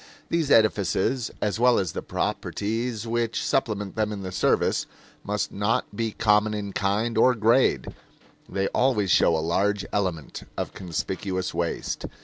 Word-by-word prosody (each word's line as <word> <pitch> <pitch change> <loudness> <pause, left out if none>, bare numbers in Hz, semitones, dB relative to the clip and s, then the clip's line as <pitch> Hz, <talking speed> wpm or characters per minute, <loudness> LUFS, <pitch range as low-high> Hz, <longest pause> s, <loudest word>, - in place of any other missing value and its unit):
These 165 -4 0
edifices, 110 +2 +2
as 105 +1 -1
well 125 0 +5
as 95 -5 0
the - - -4
properties 115 +2 -2
which 115 0 -1
supplement 105 -3 -1
them 110 -1 0
in 100 -2 -5
the 95 - -5
service, - - +1 0.4
must 105 0 -2
not 110 +5 -1
be 115 -1 -1
common 105 0 +2
in 100 -2 -4
kind 110 +3 0
or 125 +2 +5
grade; 115 +4 +2 0.6
they 95 0 -1
always 110 -7 +1
show 80 - +4
a 80 - -2
large 100 +4 +1
element 90 -7 -2 0.2
of - - -3
conspicuous 95 +1 -3
waste. 85 -1 -2
105 Hz, 145 wpm, -25 LUFS, 95-115 Hz, 0.6 s, well